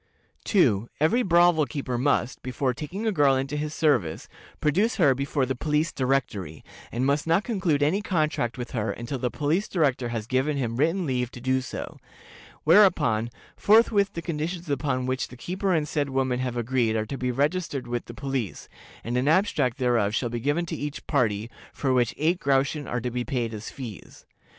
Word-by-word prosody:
"2. 120 - +3
Every 160 - +3
brothel 175 - +4
keeper 135 -4 -4
must, 125 -1 0
before 130 +1 -1
taking 175 - -5
a 220 - +2
girl 145 -7 +4
into 135 +2 -2
his 150 0 -2
service, 130 - +1 0.3
produce 195 - +2
her 145 -8 +4
before 140 +1 -1
the 130 - -1
Police 150 +5 0
Directory, 120 - -2 0.3
and 120 +3 -1
must 145 +3 +1
not 165 +5 +3
conclude 180 - 0
any 175 +8 +2
contract 155 - -1
with 120 -1 -6
her 110 -3 -1
until 120 +5 -5
the 125 - 0
Police 155 - 0
Director 135 -8 0
has 115 -2 -3
given 130 +4 0
him 120 -3 -2
written 165 +6 +1
leave 125 -4 -1
to 125 - -10
do 130 +1 +1
so; 130 - -7 0.6
whereupon, 155 - +4 0.3
forthwith 210 -1 +4
the 170 - -5
conditions 170 +2 -3
upon 130 -2 -1
which 130 0 -1
the 125 - -13
keeper 185 +8 -2
and 155 -4 +1
said 145 -2 -1
woman 130 -2 0
have 125 -1 -2
agreed 120 -1 +1
are 110 -1 0
to 125 - -5
be 125 - -1
registered 145 +2 -1
with 120 0 -3
the 115 - -10
police, 135 -7 -4 0.4
and 120 +2 -2
an 130 +3 +1
abstract 155 - +2
thereof 120 -5 +1
shall 120 - 0
be 120 0 -3
given 145 +8 0
to - - -4
each 145 0 -5
party, 110 -7 0 0.2
for 135 -2 -1
which 125 -2 +1
eight 165 +4 +1
groschen 140 +1 +1
are 120 - -2
to 125 +1 -3
be 125 +1 -2
paid 120 -4 -2
as 110 0 -6
fees. 120 -7 -10
135 Hz, 190 wpm, -26 LUFS, 120-155 Hz, 0.6 s, brothel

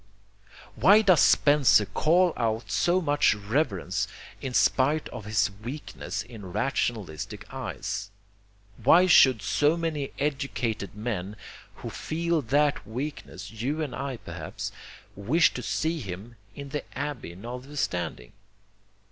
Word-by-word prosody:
Why 210 +3 +6
does 185 -5 +5
Spencer 145 -7 +5
call 170 - +2
out 115 -1 -2
so 175 +11 +2
much 145 -7 +3
reverence 100 - -1 0.3
in 130 -2 -4
spite 145 +4 +3
of 115 -4 -8
his 105 -1 +1
weakness 130 -2 -5
in 110 -6 -10
rationalistic 110 - -2
eyes? - - -4 0.7
Why 180 +2 +7
should 130 - +6
so 150 +10 +2
many 155 -4 -2
educated 135 -8 -2
men 105 -3 -4 0.4
who - - -7
feel 165 0 -1
that 140 0 +1
weakness, 120 -4 -6
you 135 +8 -2
and 140 -5 -5
I 140 -2 -4
perhaps, 85 -5 -6 0.4
wish 135 - +3
to 125 - -5
see 160 +7 -1
him 100 +1 -7 0.2
in 140 -1 -8
the 150 +1 -3
Abbey 140 - -4
notwithstanding? 105 - -4
130 Hz, 120 wpm, -27 LUFS, 105-150 Hz, 0.7 s, Why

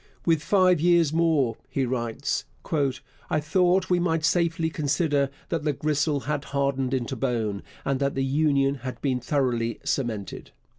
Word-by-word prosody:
'With 165 -3 +3
five 185 -1 +3
years 170 -3 +4
more,' 155 -8 +2
he 135 - 0
writes, 125 +2 -2 0.8
'I 155 - +1
thought 180 +4 +2
we 180 - +4
might 165 -2 +1
safely 165 -1 +1
consider 145 -2 +1 0.2
that 165 -3 -1
the 150 -1 +1
gristle 145 0 0
had 145 +2 -3
hardened 135 -2 0
into 120 -2 -2
bone, 110 -6 -1 0.2
and 135 -1 0
that 140 0 0
the 135 0 0
Union 140 -1 +2
had 130 -2 -6
been 130 -3 +1
thoroughly 120 -3 -1
cemented.' 110 -7 -3
140 Hz, 150 wpm, -25 LUFS, 130-160 Hz, 0.8 s, years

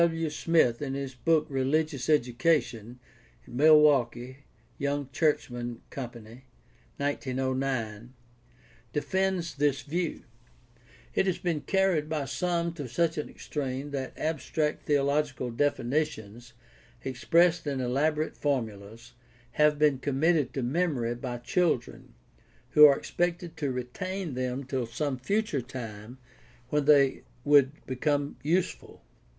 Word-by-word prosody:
W. 170 - +5
W. 165 -1 0
Smith, 150 -6 +2
in 135 -2 -3
his 135 -1 -4
book 155 +4 +2
Religious 140 0 0
Education 125 -4 +1 0.5
(Milwaukee: 130 -3 +4 0.4
Young 140 -1 -1
Churchman 120 -7 -1
Co., 140 - -5
1909), 130 0 -4 0.8
defends 190 +2 0
this 140 -1 0
view. 170 +3 -3 0.9
It 190 - +1
has 185 - +1
been 165 -4 -2
carried 190 -6 +1
by 155 -3 -1
some 170 +5 -1
to 145 -6 -6
such 165 +4 0
an 150 - -4
extreme 140 -1 -5
that 135 -2 -5
abstract 155 -1 -2
theological 140 -3 +1
definitions, 120 -3 -2 0.5
expressed 165 +6 +2
in 140 -2 -1
elaborate 150 +5 0
formulas, 115 -4 -3 0.4
have 150 0 +3
been 145 -3 +3
committed 145 +1 +1
to 135 - -1
memory 130 -4 0
by 120 0 -5
children, 120 - -1 0.6
who 150 +1 +9
are 140 -1 +4
expected 175 -1 -2
to 145 -4 -1
retain 160 +8 -4
them 130 +1 -2
till 130 -2 -3
some 130 +3 -3
future 200 - 0
time 120 -2 -8 0.5
when 150 0 +1
they 140 -2 +5 0.2
would 145 0 +4
become 145 +2 -1
useful. 170 +5 -2
140 Hz, 115 wpm, -28 LUFS, 125-155 Hz, 0.9 s, who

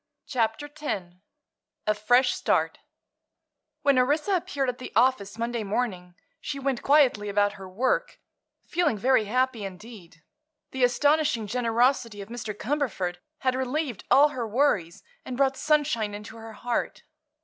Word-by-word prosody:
CHAPTER 245 -1 -1
X 285 -13 -5 0.7
A 215 - +3
FRESH 245 +5 +3
START - - 0 1.0
When 280 -2 +4
Orissa 300 +9 +2
appeared 330 -7 -1
at 250 0 -3
the 255 - -7
office 225 -4 +2
Monday 235 -1 -2
morning 195 -4 -3 0.2
she 285 - -5
went 275 -2 -1
quietly 265 -8 +3
about 205 0 +2
her 195 -2 -10
work, 265 - -1 0.5
feeling 335 -11 +1
very 245 +1 +3
happy 250 0 0
indeed. 190 -4 -10 0.5
The 265 -1 -1
astonishing 285 -1 +2
generosity 235 0 +1
of 200 +1 -8
Mr. 230 -2 -5
Cumberford 210 -7 -2 0.2
had 255 -1 +2
relieved 260 - -2
all 290 +2 +6
her 245 -5 -4
worries 215 - 0 0.2
and 250 - -6
brought 270 -1 +2
sunshine 280 -9 +1
into 210 +2 -9
her 225 0 -9
heart. 240 +2 -3
245 Hz, 140 wpm, -26 LUFS, 210-275 Hz, 1.0 s, all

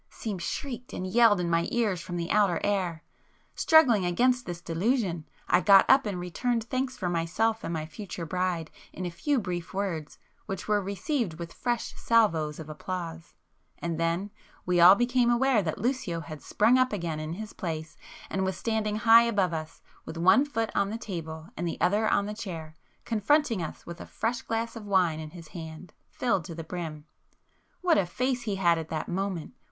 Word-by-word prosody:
seemed 205 -6 -5
shrieked 250 +4 -5
and 185 - -4
yelled 220 0 +5
in 175 - -1
my 170 0 +1
ears 215 -7 0
from 175 - -6
the 170 0 -3
outer 200 -5 +3
air. 185 -5 -1 0.5
Struggling 255 - +5
against 245 +8 +2
this 175 -1 -4
delusion, 175 - -1 0.2
I 175 - +4
got 195 -1 +7
up 265 -4 +5
and 195 -3 -3
returned 230 +7 -1
thanks 255 +2 -2
for 185 - -2
myself 175 +7 0
and - - -3
my 160 -2 -2
future 175 +1 -7
bride 180 -2 -2 0.2
in 185 - -5
a 175 - -3
few 285 - 0
brief 180 -5 -4
words 180 -7 -3 0.3
which 195 -2 -5
were 210 -1 +2
received 200 - -2
with 170 +1 -7
fresh 240 -2 -2
salvos 165 -10 +2
of 160 - -8
applause,—and 165 0 -7
then 170 +5 -1 0.3
we 180 -1 +2
all 180 +3 +10
became 245 +1 +2
aware 240 -1 +3
that 160 -5 -3
Lucio 210 -8 -1
had 155 -2 -9
sprung 230 +5 +3
up 255 0 +3
again 170 -6 -3
in 155 +1 -4
his 215 +4 -7
place, 160 -3 -5 0.3
and 190 - -2
was 190 -1 -1
standing 220 -2 -1
high 230 +1 +7
above 200 -7 +1
us 155 0 -6
all, - - -28
with 165 - -6
one 190 - +5
foot 225 -6 -2
on 200 0 +1
the 220 - -3
table 160 -7 -6
and 175 +2 -3
the 165 - -4
other 210 +4 +2
on 200 - +2
the 210 - -4
chair, 170 -8 -7 0.3
confronting 235 - +2
us 160 - -6
with 170 0 -8
a - - -9
fresh 230 +2 -2
glass 230 +1 -3
of 225 - -7
wine 180 -5 +2
in 155 -1 -6
his 165 -1 -12
hand, 160 0 -9 0.2
filled 230 -8 0
to 165 +1 -8
the 165 - -6
brim. 160 -3 -6 0.8
What 355 -3 +4
a 180 - 0
face 250 +6 -1
he 210 -4 -2
had 170 -3 +3
at 160 - -7
that 155 - -3
moment! 190 0 -3
185 Hz, 195 wpm, -28 LUFS, 170-225 Hz, 0.8 s, all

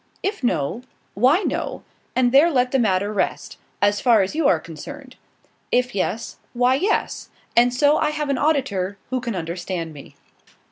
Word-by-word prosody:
If 405 -5 -2
no 180 - 0 0.3
why 265 - +3
no, - - -3 0.3
and 250 -1 +3
there 285 +6 +6
let 250 -5 +1
the 270 - +2
matter 205 -2 +1
rest, 205 - -2 0.2
as 205 0 +2
far 230 -5 +5
as 190 - -4
you 310 -2 +2
are 170 - +3
concerned; 255 - -10 0.6
if 250 0 +1
yes, 205 +3 -3 0.2
why 250 +1 +3
yes, 375 +11 -1 0.3
and 240 +1 +5
so 290 +4 +3
I 305 - +1
have 300 -1 -3
an 275 - +1
auditor 215 -11 0
who 255 -1 -1
can 235 -4 -3
understand 170 -1 -4
me. 140 -2 -13
245 Hz, 170 wpm, -22 LUFS, 195-280 Hz, 0.6 s, there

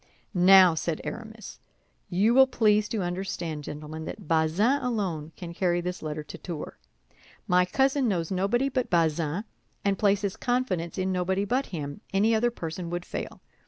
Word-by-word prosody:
"Now," 185 -1 +7
said 160 0 -2
Aramis, 220 -2 -8 0.5
"you 200 +6 +3
will 265 +1 +7
please 215 -4 +2
to 215 -4 -1
understand, 175 -4 -4
gentlemen, 155 +1 -7
that - - -8
Bazin 170 - +2
alone 190 - -2
can 170 -2 -8
carry 175 -1 +1
this 180 +1 -4
letter 155 -1 -4
to - - -10
Tours. 170 -4 -6 0.7
My 180 0 +4
cousin 270 +6 +2
knows 175 -5 -1
nobody 200 +8 +1
but 255 -2 -1
Bazin, 165 +1 +1 0.4
and 195 -1 +1
places 200 -1 +1
confidence 245 -10 -1
in 190 0 0
nobody 190 +2 0
but 255 +6 0
him; 145 -5 -6
any 210 +4 +3
other 230 +2 +3
person 170 -5 -6
would 175 +1 -4
fail. - - -6
185 Hz, 160 wpm, -27 LUFS, 165-220 Hz, 0.7 s, Now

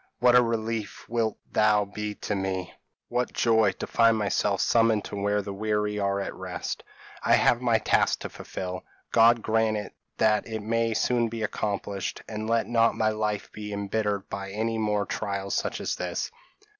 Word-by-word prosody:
what 125 0 +5
a 125 - +8
relief 115 -2 -3
wilt 115 -2 0
thou 105 -1 +4
be 105 +1 -5
to 105 - -3
me! 95 -2 -2 0.3
what 125 +1 -1
joy 110 -3 +3
to - - -6
find 115 -1 +4
myself 100 -1 +1
summoned 115 -3 +3
to - - -6
where 100 +1 0
the 100 0 -5
weary 105 0 -1
are 100 0 0
at 100 - -3
rest! - - -5 0.4
I - - +3
have 120 - +3
my 120 -2 +3
task 110 - +2
to - - -4
fulfil. 90 0 -6 0.3
God 115 0 +5
grant 110 -2 0 0.2
that 105 -1 +2
it 110 -1 -4
may 115 +1 0
soon 115 +3 +2
be 115 0 -4
accomplished, 100 -2 -3
and 110 0 -4
let 115 0 +2
not 115 -1 +3
my 110 - +3
life 105 -1 -2
be 105 -1 -7
embittered 100 0 -1
by 100 0 -5
any 110 +3 -1
more 105 -2 +1
trials 100 -1 -3
such - - -1
as - - -2
this." - - -3
105 Hz, 175 wpm, -27 LUFS, 100-115 Hz, 0.4 s, a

